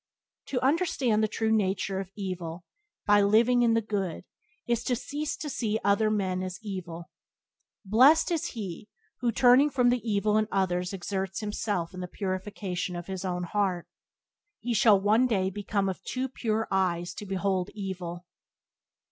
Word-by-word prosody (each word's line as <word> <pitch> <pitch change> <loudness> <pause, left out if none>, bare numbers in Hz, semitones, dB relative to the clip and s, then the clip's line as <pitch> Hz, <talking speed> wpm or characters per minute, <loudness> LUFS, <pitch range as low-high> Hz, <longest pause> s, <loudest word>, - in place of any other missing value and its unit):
To 255 - -1
understand 270 -8 +2
the 215 - +3
true 220 +1 -1
nature 195 -2 0
of 195 -2 -5
evil 180 -4 -5 0.4
by 205 -1 +5
living 230 +5 +4
in 230 -1 +4
the 225 - +1
good 195 -6 -3 0.4
is 235 0 0
to 250 - +1
cease 290 +5 -4
to 305 - -5
see 220 -6 -1
other 200 +2 +3
men 190 -3 0
as 185 0 -4
evil. 180 -4 -6 0.7
Blessed 260 - +5
is 330 -3 0
he 205 -2 -6 0.3
who, 240 -1 +1
turning 255 +5 +5
from 250 -3 +3
the 245 -1 +1
evil 210 -1 +1
in 215 0 +2
others 180 -2 0
exerts 190 +1 -3
himself 205 -4 -2
in 185 - -7
the 180 - -4
purification 185 -1 -4
of 175 -1 -5
his 190 0 -5
own 180 -1 -2
heart. 185 -1 -1 0.7
He 240 +1 -2
shall 210 -2 +5
one 215 +6 +3
day 190 -5 0
become 200 0 -1
of 190 - -3
"too 260 +1 -3
pure 225 -3 -1
eyes 175 -2 0
to 210 - -8
behold 190 -1 -1
evil." 180 -3 -5
200 Hz, 165 wpm, -28 LUFS, 185-225 Hz, 0.7 s, by